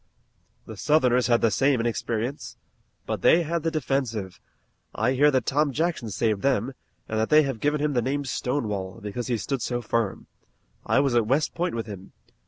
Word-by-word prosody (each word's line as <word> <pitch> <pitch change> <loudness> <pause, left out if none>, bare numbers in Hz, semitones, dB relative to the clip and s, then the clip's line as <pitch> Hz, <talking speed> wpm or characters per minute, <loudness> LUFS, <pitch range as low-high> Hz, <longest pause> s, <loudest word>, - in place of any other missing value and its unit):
"The 110 - -9
Southerners 125 -2 +3
had 120 -1 +3
the 115 - +3
same 135 +1 +2
inexperience." 115 +2 -3 0.5
"But - - -3
they 170 - +5
had 165 +1 -2
the 165 - 0
defensive. 125 - -2 0.6
I 110 +4 +1
hear 140 +3 +4
that 130 -3 +1
Tom 145 +1 +1
Jackson 160 -5 -1
saved 105 0 0
them, 135 -1 +1 0.3
and 110 - -2
that 110 - 0
they 155 0 +6
have 135 -5 -3
given 150 +3 +1
him 150 0 0
the 120 - +2
name 140 +4 -2
Stonewall, 110 -8 -3
because 105 +4 -5
he 120 -2 0
stood 135 +3 -3
so 120 +1 -2
firm. 115 -3 -2 0.6
I - - +3
was 140 -3 +1
at 115 -3 +2
West 140 +5 +1
Point 175 -5 -2
with 115 - -3
him. 100 -3 -10
125 Hz, 190 wpm, -25 LUFS, 110-145 Hz, 0.6 s, they